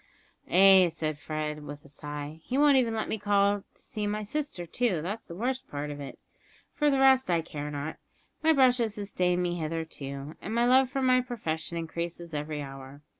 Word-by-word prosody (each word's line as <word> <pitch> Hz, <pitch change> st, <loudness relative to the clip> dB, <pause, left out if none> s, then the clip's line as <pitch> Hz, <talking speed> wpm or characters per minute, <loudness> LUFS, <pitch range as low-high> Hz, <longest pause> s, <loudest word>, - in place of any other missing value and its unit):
"Ay," 190 Hz, -1 st, +7 dB
said 155 Hz, -2 st, -3 dB
Fred, 150 Hz, 0 st, -4 dB
with 145 Hz, 0 st, -9 dB
a -, -, -13 dB
sigh, 145 Hz, +1 st, -7 dB
"he 255 Hz, -, -2 dB
won't 290 Hz, -1 st, +6 dB
even 235 Hz, -3 st, +2 dB
let 220 Hz, -, -2 dB
me 220 Hz, -, -2 dB
call 205 Hz, 0 st, +3 dB, 0.2 s
to -, -, -19 dB
see 210 Hz, -4 st, -4 dB
my 210 Hz, +1 st, -2 dB
sister 275 Hz, -6 st, -3 dB
too 200 Hz, 0 st, 0 dB
that's 205 Hz, +6 st, -5 dB
the 170 Hz, -, -8 dB
worst 250 Hz, +6 st, -2 dB
of 145 Hz, 0 st, -4 dB
it. 140 Hz, -2 st, -8 dB, 0.6 s
For 295 Hz, -1 st, +2 dB
the 275 Hz, -, +2 dB
rest 265 Hz, -3 st, +5 dB
I 170 Hz, -2 st, +3 dB
care 150 Hz, -2 st, -6 dB
not; 145 Hz, +1 st, -5 dB, 0.4 s
my 320 Hz, 0 st, +4 dB
brush 260 Hz, -4 st, +5 dB
has 220 Hz, -3 st, 0 dB
sustained 180 Hz, -3 st, 0 dB
me 175 Hz, 0 st, -1 dB
hitherto, 155 Hz, -3 st, -5 dB
and 215 Hz, -, -4 dB
my 235 Hz, +1 st, +3 dB
love 260 Hz, +1 st, +5 dB
for 270 Hz, 0 st, -2 dB
my 255 Hz, 0 st, +4 dB
profession 170 Hz, -10 st, -4 dB
increases 170 Hz, 0 st, -5 dB
every 150 Hz, 0 st, -3 dB
hour. 135 Hz, +1 st, -10 dB
180 Hz, 195 wpm, -28 LUFS, 150-240 Hz, 0.6 s, Ay